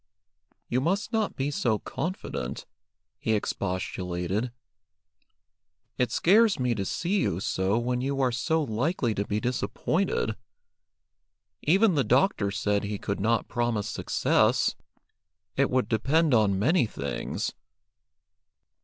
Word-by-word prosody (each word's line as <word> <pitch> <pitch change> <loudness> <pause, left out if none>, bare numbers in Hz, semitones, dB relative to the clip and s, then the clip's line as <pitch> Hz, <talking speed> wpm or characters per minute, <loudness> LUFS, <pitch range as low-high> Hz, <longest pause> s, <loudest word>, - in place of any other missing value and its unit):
"You 125 +2 0
must 195 - -1
not 220 -2 0
be 135 +2 -1
so 120 -6 +1
confident," 175 - -4 0.5
he 110 - 0
expostulated. 95 +2 -2 1.4
"It 125 -2 0
scares 210 - +4
me 125 -1 +1
to 100 -4 -3
see 185 - 0
you 85 - 0
so 95 +2 0
when 125 +1 -1
you 135 +1 -1
are 130 -2 +2
so 160 +6 0
likely 125 +1 0
to 100 0 -2
be 105 - 0
disappointed. 125 - -1 1.3
Even 195 +6 +4
the 145 -4 +2
doctor 125 - +2
said 100 +1 0
he 105 0 -3
could 100 +1 -3
not 115 +3 +1
promise 120 -4 -1
success. - - +2 0.8
It - - +2
would 130 0 +1
depend 140 +7 +2
on 105 -4 +3
many 125 - +3
things." 70 -8 -4
120 Hz, 120 wpm, -27 LUFS, 105-155 Hz, 1.4 s, scares